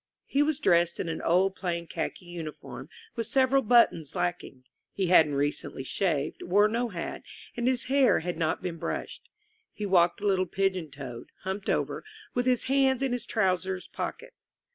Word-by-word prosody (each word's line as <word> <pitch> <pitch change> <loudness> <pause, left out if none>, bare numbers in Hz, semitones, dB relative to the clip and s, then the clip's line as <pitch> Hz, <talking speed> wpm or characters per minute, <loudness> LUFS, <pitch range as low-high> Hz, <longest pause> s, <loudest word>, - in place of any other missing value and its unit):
He 280 - +1
was 295 -1 +2
dressed 170 - +3
in - - -2
an 160 - -3
old 190 +3 +2
plain 170 -3 -3
khaki 180 - -5
uniform, 170 -3 -8 0.3
with 230 -2 -2
several 270 0 +3
buttons 215 - +3
lacking. 175 -7 -3 0.3
He 190 -3 -1
hadn't 155 -4 +6
recently 140 -1 -2
shaved, 155 -1 -1
wore 205 +4 +4
no 235 +2 -1
hat, 170 -5 -5 0.3
and 240 0 -1
his 255 -2 +2
hair 265 -5 +3
had 175 +1 -3
not 160 -1 -1
been 170 -2 -3
brushed. - - -5 0.4
He 210 - -5
walked 175 -3 +3
a 205 - -5
little 190 -2 +2
pigeon 190 -3 -1
toed, 130 -4 -8
humped 190 +2 -4
over, - - -1 0.3
with 245 +1 0
his 250 -2 +3
hands 270 -1 +2
in 270 - 0
his 245 -1 -2
trousers 190 -3 0
pockets. - - -7
190 Hz, 170 wpm, -28 LUFS, 170-240 Hz, 0.4 s, hadn't